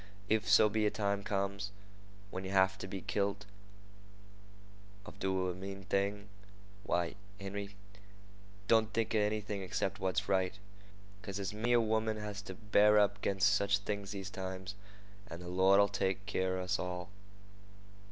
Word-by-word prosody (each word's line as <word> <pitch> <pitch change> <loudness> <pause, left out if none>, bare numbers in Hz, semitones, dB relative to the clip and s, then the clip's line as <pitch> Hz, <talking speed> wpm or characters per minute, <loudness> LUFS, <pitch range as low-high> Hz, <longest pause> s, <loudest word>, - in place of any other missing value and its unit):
If 110 0 +2
so 105 +1 +7
be 105 0 +1
a - - +4
time 100 -1 -1
comes 100 0 -2 0.6
when 95 - -4
yeh 95 - -5
have 95 -1 +4
to 95 - -5
be 95 0 -5
kilt 100 0 -1 1.6
or 110 - -9
do 95 -1 0
a 90 - -1
mean 95 +1 -7
thing, 100 +1 -1 0.6
why, 85 -5 0 0.3
Henry, 100 0 -5 0.9
don't 110 -1 +4
think 115 0 0
of 110 - +3
anything 105 -2 -2
'cept - - -1
what's 95 -1 0
right, 95 -2 +1 0.7
because 100 -2 -6
there's 100 -1 -3
many 115 +3 0
a 120 - +6
woman 110 0 +1
has 105 -1 -5
to 105 - -8
bear 105 -1 +4
up 105 0 +3
'ginst 95 -2 -1
sech 100 0 +4
things 100 0 0
these 100 -1 -5
times, 95 0 -5 0.5
and 85 -4 -7
the 90 - -9
Lord'll 95 +2 +5
take 95 0 -1
keer 95 -2 0
of 90 - -2
us 90 +3 0
all. 90 0 -4
100 Hz, 160 wpm, -34 LUFS, 95-105 Hz, 1.6 s, so